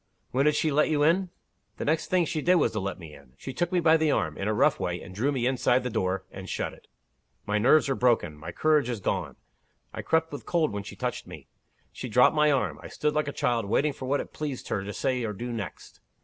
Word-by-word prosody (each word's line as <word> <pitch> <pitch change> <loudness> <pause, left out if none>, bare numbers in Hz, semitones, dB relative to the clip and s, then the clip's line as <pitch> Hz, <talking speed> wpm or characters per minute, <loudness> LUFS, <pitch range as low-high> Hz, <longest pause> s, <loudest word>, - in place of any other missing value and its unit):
"When 135 +3 +2
did 150 0 +4
she 155 0 +1
let 150 +2 +3
you 150 -2 +2
in?" 180 +4 +3 0.5
"The - - -4
next 155 +2 +1
thing 180 -2 +2
she 155 -1 -2
did 180 +4 +4
was 170 - +3
to 110 - -2
let 95 -1 -3
me 80 -4 -11
in. 60 - -16
She 130 - -7
took 175 +4 -1
me 180 - +2
by 165 -1 +5
the 160 -1 +1
arm, 80 - 0
in 100 - -3
a - - +2
rough 140 +5 +3
way, 90 0 -2
and 95 - -11
drew 125 +9 0
me 130 -4 -1
inside 130 0 +2
the 125 - -3
door, 95 -1 -1
and - - -9
shut - - -3
it. - - -18 0.6
My 105 +1 0
nerves 140 +7 +5
are 135 - +1
broken; 120 - +1
my 80 +3 -8
courage 150 - +2
is 120 -3 -3
gone. 90 -8 -2 0.6
I - - -5
crept 160 0 +1
with 145 - -7
cold 170 -3 +1
when 100 - -3
she 100 - -9
touched - - -4
me. - - -11 0.4
She 125 - -7
dropped 125 +6 +5
my 150 0 +4
arm. 135 -3 0
I - - -8
stood 150 0 -1
like 150 -1 0
a - - -2
child, 120 -5 0
waiting 145 +8 +1
for 130 - -7
what 145 +2 +1
it - - -6
pleased 145 -4 -5
her 100 - -1
to 100 - -5
say 125 +3 -1
or 105 -2 -2
do 120 +4 -5
next. 105 -4 -7
130 Hz, 260 wpm, -27 LUFS, 105-150 Hz, 0.6 s, by